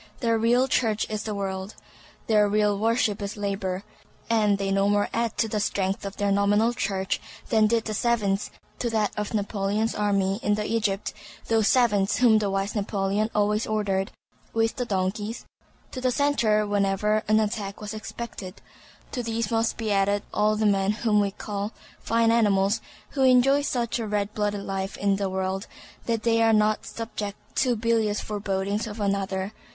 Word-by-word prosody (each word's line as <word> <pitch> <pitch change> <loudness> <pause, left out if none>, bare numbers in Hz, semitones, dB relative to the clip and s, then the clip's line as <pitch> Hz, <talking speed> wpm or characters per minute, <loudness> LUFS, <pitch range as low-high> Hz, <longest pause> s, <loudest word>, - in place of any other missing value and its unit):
Their 230 -2 +2
real 240 +3 +3
church 220 -5 +1
is 215 -1 -2
the 215 -2 -3
world; 195 0 -4 0.5
their 210 -2 +3
real 210 0 +2
worship 225 -2 +1
is 200 +1 -4
labor; 195 -2 -2 0.5
and 210 -3 +3
they 195 0 -2
no 195 +1 +2
more 205 0 +2
add 230 -1 -1
to 225 - +2
the 210 0 -2
strength 195 -1 -1
of 195 - -8
their 205 -1 +1
nominal 205 +4 +3
church 195 -4 -2 0.3
than 220 -2 +4
did 230 0 +1
the 215 - -3
savants 210 -3 0 0.3
to 240 - -1
that 220 -2 +1
of 210 +1 -3
Napoleon's 205 +2 0
army 200 -1 +1
in 210 0 +1
Egypt—those 215 0 -1
savants 210 -6 +3
whom 230 -3 +5
the 205 -2 -1
wise 195 +1 -1
Napoleon 205 0 0
always 210 +1 +1
ordered 200 -3 0 0.4
(with 225 0 +1
the 250 - -1
donkeys) 205 +2 -2 0.5
to 255 - -6
the 255 - +2
centre 235 -6 +2
whenever 205 +1 +1
an 215 +1 +4
attack 210 -2 -2
was 210 0 -6
expected. 215 -3 -7 0.5
To 250 - -2
these 230 -2 -2
must 225 0 +1
be 220 -2 -2
added 200 0 +2
all 215 +1 +2
the 215 0 0
men 200 0 +2
whom 215 -1 +1
we 200 -1 +2
call 205 +1 -5 0.3
fine 230 0 +2
animals, 205 -1 +3 0.3
who 275 - -2
enjoy 265 +2 +5
such 245 -4 -1
a 225 - -3
red 205 0 -1
blooded 205 -1 -1
life 195 0 -4
in 200 -1 +1
this 200 -1 -1
world 190 +1 -2 0.4
that 230 -2 0
they 230 -1 +3
are 225 0 +4
not 215 0 +2
subject 210 -3 -5 0.2
to 250 -2 +3
bilious 220 -2 +1
forebodings 200 0 -2
of 215 0 -7
another. 195 0 -1
210 Hz, 170 wpm, -25 LUFS, 200-225 Hz, 0.5 s, whom